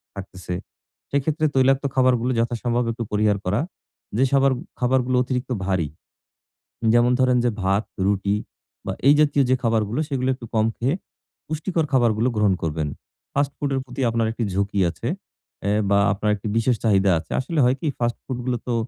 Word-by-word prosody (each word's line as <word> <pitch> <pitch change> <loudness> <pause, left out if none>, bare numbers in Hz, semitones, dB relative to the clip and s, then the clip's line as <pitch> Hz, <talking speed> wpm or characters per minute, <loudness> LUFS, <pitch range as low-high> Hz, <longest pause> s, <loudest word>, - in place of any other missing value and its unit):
থাকতেছে। 90 -2 -7 0.6
সেক্ষেত্রে 150 +3 0
তৈলাক্ত 135 +1 +4
খাবারগুলো 130 -1 +3
যথাসম্ভব 120 +1 0
একটু 115 +1 -4
পরিহার 105 -1 +2
করা। 90 +3 +1 0.6
যে 130 - +4
শবার 135 0 +4 0.3
খাবারগুলো 125 0 +2
অতিরিক্ত 125 0 -3
ভারী। 95 -6 0 1.1
যেমন 120 +1 +4
ধরেন 125 -1 +4
যে 120 - +3
ভাত, 100 +3 +1 0.2
রুটি 100 0 +1 0.5
বা - - -1 0.2
এই 145 - +8
জাতীয় 145 -2 +4
যে - - +5
খাবারগুলো 115 +2 +1
সেগুলো 130 -3 -1
একটু 125 -2 -10
কম 110 0 +3
খেয়ে 130 +6 0 0.5
পুষ্টিকর 160 +2 -1
খাবারগুলো 120 -2 +3
গ্রহণ 105 -3 +3
করবেন। 80 -1 -1 0.5
ফাস্ট 140 0 +1
ফুড 145 - -1
এর 135 - 0
প্রতি 125 0 -8
আপনার 115 -1 +1
একটি 115 0 -2
ঝুঁকি 100 +1 -1
আছে - - -5 0.5
অ্যাঁ 105 +2 +1
বা 100 - +5
আপনার 105 +1 -1
একটি 100 - -9
বিশেষ 115 +2 +2
চাহিদা 100 -3 +4
আছে। 80 - -10
আসলে 155 +5 -3
হয় 125 +2 +3
কি - - -3
ফাস্ট 120 -1 -1
ফুড 130 -2 -4
গুলো 125 -1 +1
তো 120 - +1
120 Hz, 170 wpm, -23 LUFS, 105-130 Hz, 1.1 s, এই